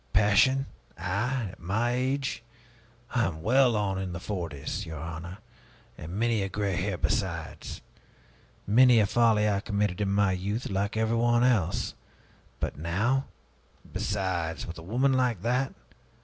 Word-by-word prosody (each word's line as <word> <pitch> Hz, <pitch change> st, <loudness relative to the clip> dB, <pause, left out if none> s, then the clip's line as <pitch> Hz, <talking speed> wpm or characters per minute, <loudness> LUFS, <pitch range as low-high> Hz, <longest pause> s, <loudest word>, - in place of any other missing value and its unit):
Passion? 105 Hz, +7 st, +4 dB, 0.3 s
I? 105 Hz, +6 st, -1 dB
At -, -, -15 dB
my 110 Hz, +7 st, 0 dB
age? 130 Hz, 0 st, -1 dB, 0.7 s
I 120 Hz, -1 st, +2 dB
am 80 Hz, -2 st, -6 dB
well 125 Hz, +2 st, +4 dB
on 100 Hz, -2 st, 0 dB
in 95 Hz, -2 st, -4 dB
the 85 Hz, -, -4 dB
forties, 85 Hz, -3 st, -4 dB
your 80 Hz, -4 st, -7 dB
honor, 85 Hz, +3 st, -6 dB, 0.6 s
and 80 Hz, +3 st, -8 dB
many 115 Hz, +1 st, +1 dB
a 95 Hz, -, -2 dB
gray 100 Hz, -1 st, -1 dB
hair 95 Hz, +1 st, -1 dB
besides. -, -, -2 dB, 0.8 s
Many 120 Hz, +3 st, +6 dB
a 105 Hz, -, +4 dB
folly 110 Hz, -1 st, +3 dB
I 100 Hz, -2 st, +2 dB
committed 100 Hz, -1 st, -1 dB
in 100 Hz, -, +1 dB
my 100 Hz, -1 st, +3 dB
youth, 100 Hz, +6 st, -2 dB
like 100 Hz, +3 st, -1 dB
everyone 115 Hz, +2 st, +2 dB
else. 105 Hz, -8 st, +1 dB, 0.7 s
But -, -, -3 dB
now 110 Hz, -, +1 dB, 0.7 s
Besides, 95 Hz, -5 st, -2 dB
with 85 Hz, 0 st, -7 dB
a -, -, -9 dB
woman 125 Hz, +10 st, +1 dB
like 125 Hz, -7 st, +1 dB
that! 125 Hz, +3 st, +1 dB
105 Hz, 145 wpm, -28 LUFS, 90-120 Hz, 0.8 s, Many